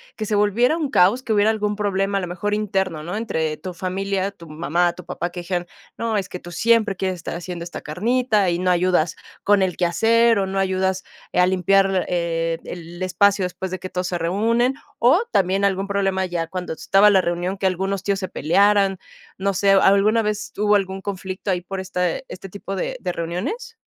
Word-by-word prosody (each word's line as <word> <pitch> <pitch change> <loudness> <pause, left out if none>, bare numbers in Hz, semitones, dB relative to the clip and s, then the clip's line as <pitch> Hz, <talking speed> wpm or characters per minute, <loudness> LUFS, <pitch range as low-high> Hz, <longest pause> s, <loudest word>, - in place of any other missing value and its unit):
que 215 - -4
se 210 - -1
volviera 220 +9 +3
un 305 -4 -2
caos, 235 +1 +3
que 225 - -1
hubiera 205 +1 +4
algún 210 -1 0
problema 200 -1 0
a - - -4
lo 180 - -4
mejor 180 +4 -3
interno, 190 -6 -1
¿no? 175 +5 -4
Entre 160 -9 -2
tu 185 +3 -7
familia, 190 +2 -2
tu 170 -4 -14
mamá, 170 +3 0
tu 180 - -12
papá, 175 - -3
que 175 0 -7
dijeran: 175 0 -3 0.3
"No, 230 -1 -1
es 195 -2 -1
que 180 - -6
tú 175 0 -10
siempre 230 -1 +2
quieres 185 0 -2
estar 170 - -6
haciendo 175 0 -6
esta 170 - -7
carnita 215 +4 +1
y 170 0 0
no 180 0 +2
ayudas 175 -2 +1 0.3
con 205 -1 +4
el 185 -2 0
quehacer 225 +6 +3
o 195 - +1
no 195 +1 -4
ayudas 190 0 0 0.3
a 180 - +4
limpiar, 190 0 +2
eh, 165 -1 -1
el 175 +1 -7
espacio 195 +2 +3
después 180 +1 -4
de 185 0 -5
que 185 - -7
todos 180 0 -2
se 180 - -2
reúnen", 225 +9 +1 0.2
o 310 - +4
también 195 +2 +2
algún 195 0 0
problema 195 -1 0
ya 175 -2 -3
cuando 180 +1 -5
estaba 195 +5 +4
la 195 -2 +5
reunión, 175 +2 -2
que 190 - +1
algunos 190 +1 -2
tíos 200 -1 0
se 185 - -4
pelearan, 195 +4 +2 0.4
no 195 +1 0
sé, 195 +1 +3
¿alguna 200 +3 +4
vez 210 -1 -3
hubo 210 0 +3
algún 190 -1 -1
conflicto 190 0 -4
ahí 180 - 0
por 190 +2 -6
este 185 - -2
este 195 - -8
tipo 195 0 -6
de - - -2
de 180 - -2
reuniones? 210 - -4
190 Hz, 205 wpm, -22 LUFS, 180-205 Hz, 0.4 s, la